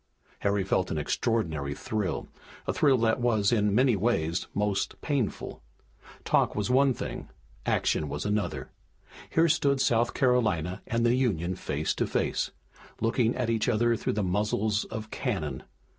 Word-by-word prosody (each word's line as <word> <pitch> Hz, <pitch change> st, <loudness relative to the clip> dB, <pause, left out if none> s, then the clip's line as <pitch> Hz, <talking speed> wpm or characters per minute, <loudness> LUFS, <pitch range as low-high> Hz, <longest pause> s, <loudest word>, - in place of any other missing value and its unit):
Harry 100 Hz, -1 st, +1 dB
felt 95 Hz, -1 st, 0 dB
an 80 Hz, -, -2 dB
extraordinary 75 Hz, -4 st, -1 dB
thrill, 105 Hz, +2 st, -3 dB, 0.4 s
a -, -, -1 dB
thrill 140 Hz, -3 st, +4 dB
that 115 Hz, +1 st, +2 dB
was, 110 Hz, -5 st, +2 dB
in 105 Hz, -3 st, +2 dB
many 125 Hz, -1 st, +4 dB
ways, 90 Hz, -6 st, 0 dB
most 105 Hz, -1 st, -1 dB
painful. 135 Hz, -8 st, -2 dB, 0.6 s
Talk -, -, +2 dB
was 105 Hz, +3 st, -1 dB
one 135 Hz, +1 st, +5 dB
thing, -, -, -5 dB, 0.4 s
action 75 Hz, -, +1 dB
was -, -, -4 dB
another. 100 Hz, -11 st, -2 dB, 0.6 s
Here 165 Hz, +1 st, +3 dB
stood 140 Hz, -3 st, +2 dB
South 120 Hz, -2 st, +2 dB
Carolina 110 Hz, -, +1 dB
and 115 Hz, +1 st, +1 dB
the 120 Hz, -, +4 dB
Union 100 Hz, -9 st, 0 dB
face 75 Hz, -1 st, -2 dB
to -, -, -1 dB
face, -, -, 0 dB, 0.5 s
looking 115 Hz, +1 st, +1 dB
at 120 Hz, -2 st, 0 dB
each 115 Hz, +1 st, +1 dB
other 120 Hz, 0 st, +2 dB
through -, -, -2 dB
the 105 Hz, 0 st, 0 dB
muzzles 105 Hz, +3 st, 0 dB
of 110 Hz, -1 st, -7 dB
cannon. 80 Hz, -, -2 dB
110 Hz, 150 wpm, -28 LUFS, 95-120 Hz, 0.6 s, one